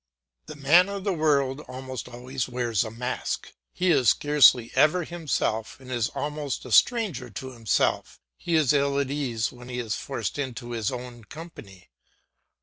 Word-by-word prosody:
The 155 - -8
man 160 +7 +5
of 200 -1 -5
the 200 -1 0
world 145 -4 +1
almost 130 0 -7
always 125 +1 -4
wears 120 -4 0
a 110 - -5
mask. 125 +3 -4 0.2
He 180 0 +1
is 130 -8 +4
scarcely 130 -3 +5
ever 155 +6 +4
himself 150 -10 -2
and 130 -1 -11
is 120 -3 0
almost 145 -1 -3
a 125 - -8
stranger 180 - +3
to 130 +4 -7
himself; 115 -6 0 0.2
he 170 - -2
is 150 -4 +4
ill 140 -1 +2
at 140 -1 -1
ease 125 -6 -1
when 120 0 -12
he 125 - -5
is 115 -4 -2
forced 110 +5 -4
into 120 -3 -4
his 115 -1 -1
own 125 -2 -8
company. 105 - -12
130 Hz, 165 wpm, -26 LUFS, 120-150 Hz, 0.2 s, man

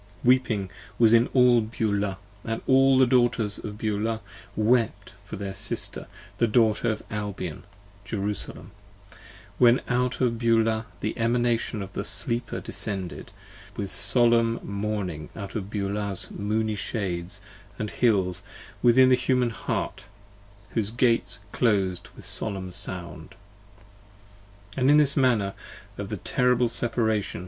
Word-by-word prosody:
Weeping 120 -6 +2 0.3
was 115 -1 +5
in 115 +1 +5
all 125 -2 +4
Beulah, 105 -3 -2 0.3
and 115 0 -4
all 135 0 +4
the 130 - +6
Daughters 120 -4 +2
of 105 -1 -7
Beulah 110 +1 -2 0.3
Wept 110 -3 0
for 100 - -8
their 100 -1 -5
Sister 95 - +3 0.3
the 115 - +3
Daughter 110 -1 +2
of 110 - -3
Albion, 100 -6 -5 0.4
Jerusalem: 100 -2 -4 0.9
When 120 0 +5
out 125 0 -1
of 115 -3 0
Beulah 115 -1 +1
the 105 - -3
Emanation 115 -2 0
of 95 -1 -11
the - - -3
Sleeper 120 +1 0
descended, 95 -4 -4 0.5
With 100 -2 -4
solemn 115 -2 +3
mourning 100 -6 -4
out 100 -2 -7
of 100 -3 -5
Beulah's 100 -1 -1
moony 110 +1 -2
shades 100 -3 -3 0.4
and 105 -1 -4
hills, 95 -7 +2
25 - - -17
Within 130 +2 +5
the 130 - +6
Human 125 -1 0
Heart, - - -4 0.7
whose 105 -3 -1
Gates 115 -3 +1
closed 95 -6 0
with - - -10
solemn 95 -4 +3
sound. 85 -4 -6 1.4
And 140 +3 +4
this 145 -2 +7
the - - +1
manner 110 -7 +1 0.5
of - - -5
the - - -4
terrible 125 -1 +1
Separation. 110 -5 +1
110 Hz, 130 wpm, -25 LUFS, 100-120 Hz, 1.4 s, this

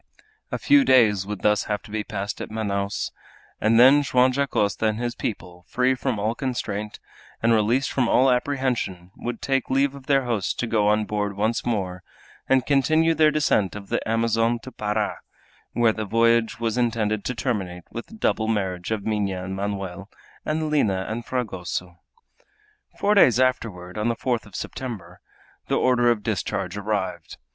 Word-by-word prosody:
A - - -1
few 285 -1 +5
days 110 - +4
would 105 -3 -5
thus 105 -1 +3
have 105 -1 -3
to - - -13
be 110 0 -2
passed 100 0 -5
at - - -5
Manaos, 100 -2 -2 0.5
and 115 +2 +3
then 135 +4 +7
Joam 130 -2 +3
Dacosta 110 -6 0
and 110 0 0
his 120 0 -2
people, 90 -6 -6
free 125 +1 +2
from 130 -2 -2
all 105 +2 0
constraint, 105 -5 -4 0.4
and 115 0 +4
released 115 +5 +2
from 125 -3 +1
all 130 +1 +4
apprehension, 125 -9 -1
would 120 -1 -5
take 135 -1 0
leave 135 +1 +2
of 140 -2 -12
their 135 -2 +3
host 115 -5 -1
to - - 0
go 110 -3 +1
on 105 0 +2
board 105 -1 -2
once 110 +3 0
more 95 -6 -2 0.5
and 130 -1 +3
continue 155 +4 +3
their 155 -1 +4
descent 145 -11 +1
of 100 -1 -9
the - - 0
Amazon 115 +1 +2
to 130 - -9
Para, 105 -1 -2 0.5
where 115 -2 +3
the 110 - -4
voyage 115 +2 +2
was 115 +1 -1
intended 110 -3 0
to 125 - -2
terminate 95 -9 -3
with 115 - -6
the 225 - -13
double 110 - 0
marriage 95 -5 -2
of 110 -3 -2
Minha 100 -4 -1
and 95 +1 -5
Manoel 100 -1 -4 0.3
and 155 0 -2
Lina 100 -11 +1
and 115 +2 -4
Fragoso. 90 -7 -4 1.0
Four 205 - +2
days 130 - +5
afterward, 110 -8 -1
on 105 - 0
the 120 - +1
fourth 120 -2 -2
of 100 - -14
September, 95 -9 -6 0.5
the - - +1
order 120 -1 +3
of 115 -3 +1
discharge 100 -1 -2
arrived. 100 -5 -3
110 Hz, 175 wpm, -24 LUFS, 100-125 Hz, 1.0 s, then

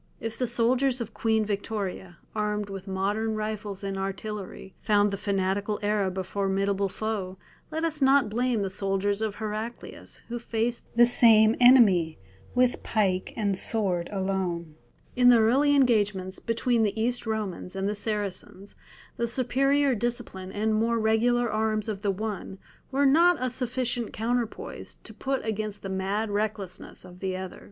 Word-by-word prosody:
If 225 0 -4
the 250 - +1
soldiers 245 +3 +2
of 230 -2 -5
Queen 220 -1 +1
Victoria, 200 -3 -4 0.2
armed 210 -1 -2
with 195 0 -7
modern 205 +4 -1
rifles 215 -2 -4
and 195 -1 -3
artillery, 195 0 -5
found 205 -1 +3
the - - -1
fanatical 200 +1 -1
Arab 205 -3 0
a 190 - -1
formidable 195 +1 0
foe, 195 -3 -4 0.3
let 320 +1 -2
us 310 -2 -1
not 270 -2 +5
blame 235 0 0
the 195 - -3
soldiers 200 +1 -1
of 215 -2 -2
Heraclius 215 +2 -6
who 240 0 -4
faced 230 +1 -2
the 240 0 +7
same 225 -2 +6
enemy 210 -11 +6 0.4
with 250 0 +2
pike 190 -4 0
and 205 -3 0
sword 185 -4 0
alone. 190 -4 -2 0.4
In 245 0 +6
the 245 - +8
early 265 +6 +4
engagements 205 -8 +2
between 230 +1 0
the 215 0 0
East 240 +1 -1
Romans 205 -4 -3
and 195 0 -1
the 205 - 0
Saracens 205 -2 -4 0.4
the 235 - 0
superior 270 +3 +2
discipline 230 -5 -3
and 215 +2 0
more 230 +2 +1
regular 235 +2 +2
arms 215 0 0
of 205 -3 -4
the 205 - 0
one 200 -1 -4 0.3
were 280 +1 +2
not 340 +6 +5
a 255 -1 -1
sufficient 250 -1 -2
counterpoise 235 0 -3
to - - -9
put 270 -2 -2
against 215 -1 -3
the 195 - -4
mad 195 +3 -1
recklessness 205 -3 -4
of 180 0 -13
the 185 -1 -2
other. 185 -1 -7
215 Hz, 155 wpm, -27 LUFS, 195-235 Hz, 0.4 s, the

